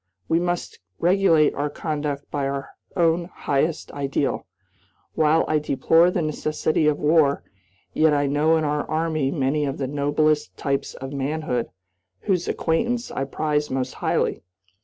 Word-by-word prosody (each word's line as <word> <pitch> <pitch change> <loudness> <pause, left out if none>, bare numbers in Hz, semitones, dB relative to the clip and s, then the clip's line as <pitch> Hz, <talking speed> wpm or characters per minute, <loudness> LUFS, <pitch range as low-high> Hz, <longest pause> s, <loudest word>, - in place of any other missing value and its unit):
We 165 - +2
must 175 0 -3 0.2
regulate 175 -4 +4
our 145 +1 -2
conduct 145 -2 -4
by 140 -2 -1
our 135 0 -4 0.2
own 170 -1 +2
highest 155 -2 -2
ideal. 140 -1 -2 0.7
While 155 +1 +3
I 155 - +2
deplore 160 +4 +3
the 180 -2 -1
necessity 155 0 0
of 150 -1 +2
war, 150 -2 +3 0.5
yet 155 0 +4
I 145 -1 +2
know 150 +3 +3
in 160 - 0
our 150 0 -1
Army 155 -3 0
many 140 0 0
of 140 -1 -2
the 135 - -2
noblest 145 +2 0
types 140 -1 -2
of 135 +1 -7
manhood, 140 -3 -2 0.5
whose 180 -3 0
acquaintance 235 +9 -1
I 135 - -2
prize 150 +1 -1
most 130 -1 -2
highly. - - -1
150 Hz, 145 wpm, -23 LUFS, 140-160 Hz, 0.7 s, regulate